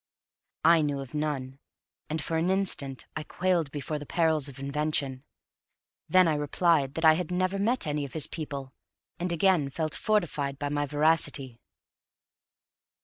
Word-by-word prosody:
I 165 0 +6
knew 145 -2 -1
of 135 0 -8
none, 140 -3 -3 0.5
and 155 -1 -2
for 165 - -2
an 165 +3 +1
instant 180 -9 0
I 155 - -2
quailed 175 -1 0
before 150 +1 -4
the 145 - -8
perils 160 -4 +1
of 135 -2 -10
invention; 140 -1 -1 0.9
then 185 -1 +6
I 160 - +2
replied 145 -1 +1
that 165 - 0
I 160 - +8
had 170 0 -2
never 185 +2 0
met 235 +6 +1
any 150 -1 -1
of 140 - -7
his 155 -3 +1
people, 140 -4 -6 0.5
and 175 0 -2
again 170 -4 +2
felt 155 +3 -3
fortified 155 -10 0
by 145 +1 -3
my 145 0 -1
veracity. 145 -4 +1
150 Hz, 155 wpm, -28 LUFS, 140-170 Hz, 0.9 s, I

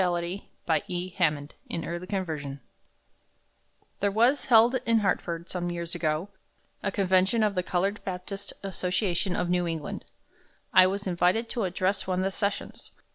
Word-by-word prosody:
Nina 180 - +3 0.7
Case. 180 0 -4
JACK'S 150 -5 +1 0.2
FIDELITY 165 -5 -3 1.4
There 200 - +2
was 240 +7 +3
held, 235 0 +6
in 230 -1 +3
Hartford, 170 -4 -1
some 175 -1 -2
years 170 -1 -4
ago, 155 +4 -1 0.5
a 200 - -1
convention 190 +3 +3
of 210 -1 +2
the 180 - +1
colored 190 +3 -1
Baptist 195 +2 -5
Association 185 -1 0
of 180 - 0
New 180 -1 +2
England. 160 -3 -4 0.7
I 185 0 +8
was 200 +2 -2
invited 180 +5 +2
to 230 -5 -1
address 185 +2 0
one 185 0 +1
of - - 0
the 195 - 0
sessions. 200 +1 -3
185 Hz, 140 wpm, -28 LUFS, 175-200 Hz, 1.4 s, I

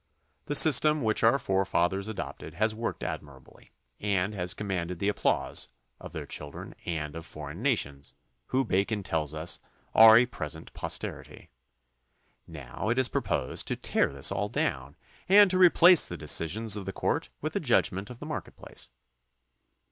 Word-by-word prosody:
The 145 - -1
system 150 0 +6
which 110 -1 +1
our 115 +4 +4
forefathers 95 -2 0
adopted 110 - -7
has 110 +1 +1
worked 115 +1 -5
admirably 70 -3 -9 0.3
and 100 -1 -1
has 90 -2 -2
commanded 90 -4 -4
the 100 +4 0
applause 105 - 0 0.3
of - - -10
their - - -6
children 75 -1 -7
and 75 -3 -4
of 80 - -7
foreign 75 +3 -9
nations, 70 - -1 0.3
who 130 +1 0
Bacon 100 +1 -1
tells 80 -4 -2
us 80 +2 0 0.3
are 110 0 +9
a 120 - +5
present 80 -8 -6
posterity. - - -5 1.0
Now 80 - -6
it 120 - 0
is 130 -1 +4
proposed 65 - -2
to - - -1
tear - - 0
this 70 -1 0
all - - -1
down 65 +3 -3 0.3
and 200 0 +7
to 185 - +1
replace 180 -1 +7
the 90 - -6
decisions 90 +8 +2
of 100 -2 -6
the 95 - -4
court - - -2
with - - -3
the - - -1
judgment 95 +2 0
of 125 -1 -11
the - - -8
market - - -6
place. - - -6
95 Hz, 160 wpm, -28 LUFS, 80-115 Hz, 1.0 s, are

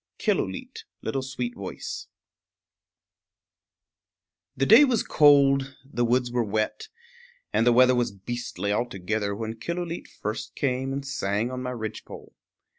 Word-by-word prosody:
[Illustration: - - -1 0.3
Killooleet] 120 -5 -4 2.5
The 135 - +2
day 225 - +9
was 250 -6 +2
cold, 140 -2 +4
the 135 -3 -2
woods 120 +1 +1
were 120 -1 +1
wet, 110 0 -2 0.7
and 115 - +3
the - - +7
weather 130 +1 +6
was 120 -2 +1
beastly 100 -1 -4
altogether 105 -2 -2
when 110 +1 -5
Killooleet 170 +5 -4
first 110 +1 -5
came 130 -1 -1
and 135 +1 -4
sang 115 -3 -1
on 130 0 -4
my 125 - -3
ridgepole. 110 -3 -7
120 Hz, 115 wpm, -26 LUFS, 110-135 Hz, 2.5 s, day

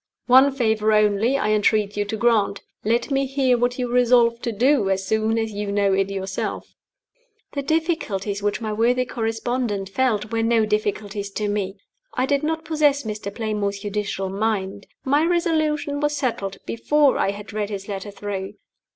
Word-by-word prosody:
One 260 +3 +6
favor 220 -4 +1
only 215 +5 +3
I 215 -5 0
entreat 210 -1 +2
you 205 0 0
to 220 +2 -4
grant 215 -3 +2 0.2
let 235 +6 0
me 275 0 +1
hear 265 -2 +2
what 245 +1 0
you 250 -1 -1
resolve 240 -1 +3
to 235 - -2
do 240 -1 +2
as 190 0 0
soon 220 +2 +1
as 225 -1 -1
you 205 0 -4
know 200 -1 +2
it 195 0 +1
yourself." 195 -1 -4 0.8
The 280 - -3
difficulties 275 - -1
which 205 +3 -1
my 215 -1 -2
worthy 245 +3 +2
correspondent 225 -3 -2
felt 215 -2 0
were 225 0 0
no 225 -1 +3
difficulties 205 -1 -2
to 210 - -2
me. 205 -2 -2 0.4
I 255 - +1
did 280 0 +1
not 320 +1 -2
possess 300 -3 +2
Mr. 215 -2 -5
Playmore's 205 -2 -2
judicial 205 -2 -3
mind. 200 -1 -2 0.2
My 285 +3 +3
resolution 310 -4 0
was 295 0 0
settled 225 -8 -2
before 290 +4 +2
I - - +2
had 205 +1 -7
read 210 -1 -2
his 195 -2 -6
letter 200 0 -5
through. 200 -1 -5
220 Hz, 170 wpm, -23 LUFS, 205-255 Hz, 0.8 s, One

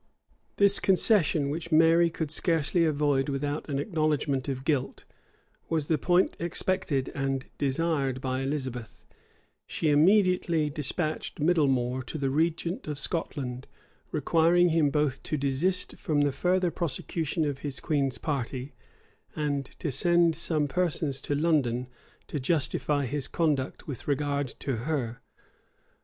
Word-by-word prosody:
This 200 0 +4
concession, 175 -7 +3
which 170 +2 -5
Mary 165 +2 +5
could 160 -2 -4
scarcely 165 +1 +1
avoid 145 -3 +1
without 145 +2 -3
an 140 - -1
acknowledgment 150 -4 0
of 130 -1 -3
guilt, 140 -4 -1 0.6
was 160 -3 0
the 155 0 +1
point 180 +1 +2
expected 170 -5 -1
and 135 -1 -2
desired 140 -2 0
by 130 0 -2
Elizabeth: 130 -4 -4 0.6
she 155 - 0
immediately 170 -1 +3
despatched 155 +2 -3
Midlemore 135 -6 +2
to - - -4
the 135 -2 -1
regent 165 - -1
of 150 -1 -3
Scotland; 135 -4 -4 0.4
requiring 170 +4 +3
him 160 -3 +3
both 145 -2 0
to 155 - -3
desist 140 +7 0
from 150 -3 0
the 145 -1 +2
further 180 +5 +1
prosecution 160 0 -2
of 140 -2 -2
his 140 -3 -5
queen's 140 -4 0
party, 135 -2 -3 0.6
and 145 -2 -1
to 155 - -3
send 170 +4 +3
some 155 -2 0
persons 155 -4 -1
to 145 - -2
London 140 -6 +1 0.4
to 150 - -4
justify 145 0 0
his 140 +1 -3
conduct 150 -6 -1
with 140 -6 -7
regard 145 -1 0
to 135 -4 -2
her. 125 -2 -3
150 Hz, 130 wpm, -28 LUFS, 135-165 Hz, 0.6 s, Mary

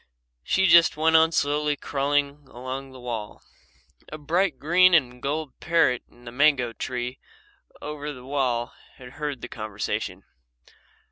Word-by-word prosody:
She 190 - +1
just 170 -3 +6
went 160 +1 +3
on 160 0 +5
slowly 150 -1 +1
crawling 145 0 -1
along 130 +2 -7
the 130 - -12
wall. 115 -4 -6 0.7
A 155 - -6
bright 160 +1 0
green 175 +5 +5
and 125 -5 +1
gold 150 -1 -3
parrot 165 -7 +2
in 120 0 -21
the 120 - -8
mango 130 -3 +2
tree 125 +1 -4 0.6
over 150 0 -5
the 125 -3 -11
wall 130 -4 -1 0.2
had 125 -1 -12
heard 145 -2 -5
the - - -6
conversation. 105 -2 -4
140 Hz, 140 wpm, -25 LUFS, 125-155 Hz, 0.7 s, just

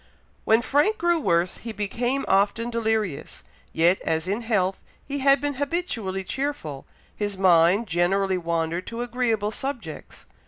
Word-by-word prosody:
'" - - -37
When 225 +2 +4
Frank 295 +12 +2
grew 345 -3 +2
worse, 175 - +1
he 230 - -7
became 240 +6 -2
often 205 +4 +2
delirious. 220 -8 -2 0.3
Yet 170 +3 +3
as 160 +2 -1
in 205 +5 -1
health 195 -5 0 0.2
he 285 +1 -4
had 275 +1 +5
been 290 +1 -2
habitually 265 - -2
cheerful, 190 - -4 0.3
his 205 -2 -3
mind 185 +3 +4
generally 185 +1 +1
wandered 170 +1 -2
to 235 +1 -4
agreeable 230 -4 0
subjects. 235 - -6
210 Hz, 145 wpm, -24 LUFS, 180-250 Hz, 0.3 s, had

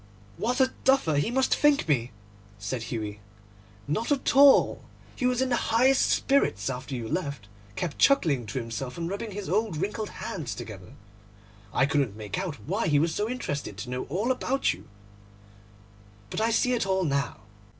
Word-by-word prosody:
'What 245 +4 -1
a 260 0 +3
duffer 265 - +3
he 145 - +1
must 260 +2 +2
think 295 - +3
me!' 125 -6 +1 0.5
said 105 +5 -4
Hughie. 105 -3 -4 0.7
'Not 220 - -1
at 280 -2 +1
all. 280 0 +6 0.3
He 250 - 0
was 250 0 +2
in 260 - -1
the 240 -2 0
highest 260 +3 +4
spirits 135 - +2
after 130 +2 -5
you 115 -2 -4
left; 140 - -3 0.3
kept 170 -5 -4
chuckling 150 - +3
to 130 - -5
himself 125 +3 -4
and 165 -1 -3
rubbing 200 +4 -4
his 205 -1 -6
old 210 -3 0
wrinkled 210 +5 -2
hands 140 - -5
together. 95 -4 -9 0.8
I 135 - +3
couldn't 135 -7 0
make 110 - -4
out 185 -6 -3
why 200 +4 0
he 145 -2 +3
was 160 +2 +2
so 210 +5 -1
interested 145 - -4
to 125 +3 -6
know 125 0 -3
all 200 - -1
about 265 +1 0
you; - - -14 1.4
but - - -2
I 225 - +2
see 250 +2 +2
it 230 -5 0
all 190 0 +1
now. 140 -4 -1
170 Hz, 175 wpm, -27 LUFS, -, 1.4 s, all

